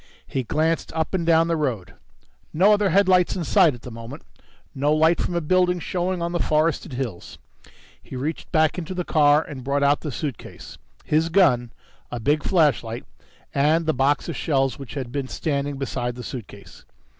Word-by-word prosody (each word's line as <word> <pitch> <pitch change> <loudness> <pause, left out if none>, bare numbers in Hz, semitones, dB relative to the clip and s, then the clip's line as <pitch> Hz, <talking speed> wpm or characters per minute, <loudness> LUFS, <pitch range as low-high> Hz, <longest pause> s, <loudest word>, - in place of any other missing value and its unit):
He 135 - -3
glanced 160 +6 -1
up 160 +2 -2
and 170 -3 -1
down 165 0 +4
the 170 - +1
road. 125 - -3 0.6
No 195 +7 +4
other 205 -1 +2
headlights 185 -2 +3
in 180 - -3
sight 170 - +4
at 120 - -15
the 125 - -8
moment, 115 +6 -9 0.5
no 145 +1 0
light 160 +2 +3
from 175 - -2
a 170 - 0
building 180 +2 +2
showing 180 +1 -2
on 170 - -2
the 175 - -1
forested 155 0 0
hills. 120 -8 -5 0.6
He - - -10
reached 145 +6 -4
back 155 +1 +2
into 180 +2 -6
the 180 - -2
car 150 -1 +4
and 130 -3 -9
brought 140 +2 0
out 145 +1 +3
the 150 - -4
suitcase, 135 -2 -7 0.3
his 160 +2 +1
gun, 130 -11 +3 0.4
a 120 - -5
big 145 +6 +1
flashlight 145 - +1 0.5
and 155 +4 +2
the 160 - +1
box 140 +2 +1
of 170 - -4
shells 135 -3 0
which 135 0 -9
had 130 -4 -5
been 140 -1 -3
standing 140 -1 -2
beside 125 -2 -3
the 125 - -8
suitcase. 100 -6 -10
150 Hz, 185 wpm, -23 LUFS, 135-170 Hz, 0.6 s, down